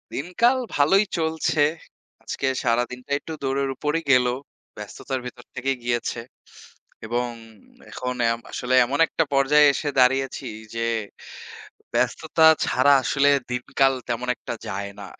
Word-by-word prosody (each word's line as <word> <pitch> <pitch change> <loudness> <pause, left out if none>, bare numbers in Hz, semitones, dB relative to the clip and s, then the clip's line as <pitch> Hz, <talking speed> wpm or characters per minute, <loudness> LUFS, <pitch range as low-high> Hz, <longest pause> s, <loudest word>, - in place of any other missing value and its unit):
দিনকাল 230 - +1 0.2
ভালোই 175 +8 +4
চলছে। 160 -1 -1 0.6
আজকে - - -4 0.2
সারাদিনটা 125 +2 -1
একটু 160 - -8
দৌড়ের 135 0 0
উপরেই 150 +4 -2
গেল। 125 -1 +5 0.5
ব্যস্ততার 105 +5 -5
ভিতর 125 0 -9
থেকেই 135 +1 -1
গিয়েছে। 120 -1 -2 0.9
এবং 120 +2 -1 0.6
এখন 125 0 -4 0.2
এম 115 - -3
আসলে 125 +1 -3
এমন 140 +4 -3
একটা 165 - 0
পর্যায়ে 145 +2 +5
এসে 145 - -2
দাঁড়িয়েছি 135 +1 +2 0.3
যে, 115 0 -1 1.1
ব্যস্ততা 160 - +2 0.2
ছাড়া 140 +3 +4
আসলে 140 +2 +2 0.2
দিনকাল 135 +2 +1 0.2
তেমন 120 +1 -2
একটা - - -7
যায় 100 +1 -4
না - - -7
135 Hz, 120 wpm, -23 LUFS, 125-145 Hz, 1.1 s, গেল